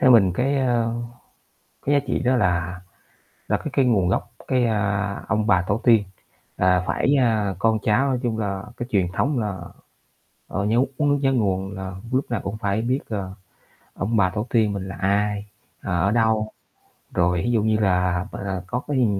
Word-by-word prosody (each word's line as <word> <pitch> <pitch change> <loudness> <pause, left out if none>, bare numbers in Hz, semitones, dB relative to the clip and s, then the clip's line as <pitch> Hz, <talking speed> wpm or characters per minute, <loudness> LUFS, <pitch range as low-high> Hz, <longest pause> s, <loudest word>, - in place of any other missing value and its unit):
Theo 130 - +5
mình 100 -7 +6
cái, 135 +9 0
a, 120 -3 +2 1.0
cái 145 - +2
giá 140 - +5
trị - - 0
đó 130 0 +2
là 90 -4 0 0.7
là - - +2
cái - - -10
cái 135 - +3
nguồn 105 -8 +3
gốc, 95 - -1 0.2
cái, 130 -2 +2
a, 100 -2 0
ông 105 0 +1
bà 95 -4 +4
tổ 105 +3 +1
tiên 115 -4 +6 0.5
là 90 0 +3
phải, 140 - +1
a, 110 -5 +1
con 110 +2 +2
cháu 120 +6 +2
nói 130 -2 0
chung 115 -3 -1
là 100 -3 -2
cái 120 0 -5
truyền 95 -6 +2
thống 140 +7 0
là, 105 -4 -2 0.9
ờ, 95 - -2
nhớ 110 +3 +2 0.2
uống 145 -1 +2
nước 145 - +3
nhớ 135 -1 +2
nguồn 95 -5 0
là 95 0 -5 0.2
lúc 130 0 0
nào 115 - -1
cũng 100 +2 -4
phải 100 -1 -1
biết, 125 +4 0
ờ, 100 -4 -4 0.6
ông 110 +4 -1
bà 95 -3 +3
tổ 105 +4 -3
tiên 110 -3 +2
mình 95 -1 -4
là 95 - -7
ai, 100 +1 0 0.3
ờ, 90 -1 -1
ở - - +3
đâu, 110 -1 +2 0.6
rồi 90 0 +2
ví 120 - +1
dụ 110 -3 +2
như 110 -1 +2
là, 90 -2 +1
à, 95 -2 -4
có 125 - -2
cái, 145 -2 0
ư, 125 - +4
105 Hz, 200 wpm, -23 LUFS, 95-120 Hz, 1.0 s, mình